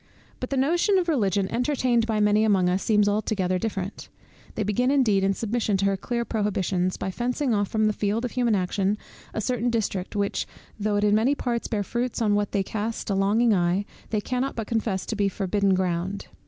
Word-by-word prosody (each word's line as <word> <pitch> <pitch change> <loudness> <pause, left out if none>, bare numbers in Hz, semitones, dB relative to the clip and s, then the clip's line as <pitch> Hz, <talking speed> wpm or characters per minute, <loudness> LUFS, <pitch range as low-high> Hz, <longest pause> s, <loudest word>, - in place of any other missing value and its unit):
But 255 - -4
the 275 - -1
notion 345 +9 +3
of 360 -2 +1
Religion 200 - +1
entertained 245 -3 +1
by 220 -2 0
many 210 +1 +3
among 195 -4 +3
us 185 +2 0
seems 210 -2 +3
altogether 205 -3 0
different. 195 -2 -4 0.5
They 215 - -1
begin 210 +5 +1
indeed, 235 -9 +3
in 195 0 +2
submission 220 -2 0
to 195 - 0
her 195 0 +2
clear 235 +5 -3
prohibitions, 190 -4 -1
by 190 - -3
fencing 250 +4 -1
off 205 -1 +1
from 220 +1 +1
the 215 - +2
field 210 +4 -1
of 245 - -4
human 240 -4 +1
action, 195 +2 0 0.3
a - - -3
certain 245 +2 0
district, 205 -5 -2
which, 200 -1 -1 0.3
though 210 0 0
it 205 - +1
in 205 0 +3
many 230 +7 +3
parts 240 -4 -2
bear 210 -3 -1
fruits 240 +4 -2
on 215 -3 +2
which 205 0 +1
they 200 -2 0
cast 215 +2 -3
a - - +2
longing 210 +4 +3
eye, 180 +2 +1 0.2
they 215 -2 0
cannot 255 +5 -2
but 225 - -3
confess 215 -4 -1
to 225 - -3
be 200 -1 +1
forbidden 195 0 +1
ground. 185 +1 -2
210 Hz, 210 wpm, -25 LUFS, 195-235 Hz, 0.5 s, notion